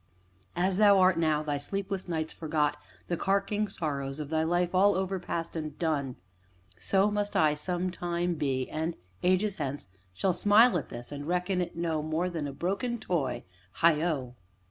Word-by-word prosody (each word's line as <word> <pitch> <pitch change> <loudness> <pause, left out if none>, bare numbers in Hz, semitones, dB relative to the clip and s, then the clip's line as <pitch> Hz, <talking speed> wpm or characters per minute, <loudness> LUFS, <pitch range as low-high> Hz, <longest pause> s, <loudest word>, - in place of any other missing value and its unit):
As 180 +2 +1
thou 205 -1 +6
art 185 -2 +4
now, 155 -2 +2
thy 145 -2 -2
sleepless 195 +4 -3
nights 160 -2 -2
forgot 150 -2 0 0.3
the 175 - -1
carking 200 +3 0
sorrows 140 -6 -4
of 150 -2 -5
thy 160 0 +2
life 175 +2 +1
all 200 +2 +5
overpast, 180 -3 -3
and 155 -2 -5
done 145 -6 -1 0.6
so 195 - +2
must 205 0 -1
I 155 -2 +4
some 180 +4 -2
time 175 0 -1
be, 135 -5 -1
and, 160 +2 -3 0.3
ages 185 +2 +2
hence, 140 -4 -4 0.3
shall 180 - 0
smile 210 +5 +5
at 140 - -9
this, 120 +2 -7
and 145 0 -6
reckon 180 +1 0
it 175 - -4
no 165 -2 -1
more 160 +4 -1
than 160 -4 -3
a - - -4
broken 200 - -2
toy 165 - -2 0.4
heigho! 155 -6 +2
170 Hz, 165 wpm, -29 LUFS, 150-190 Hz, 0.6 s, thou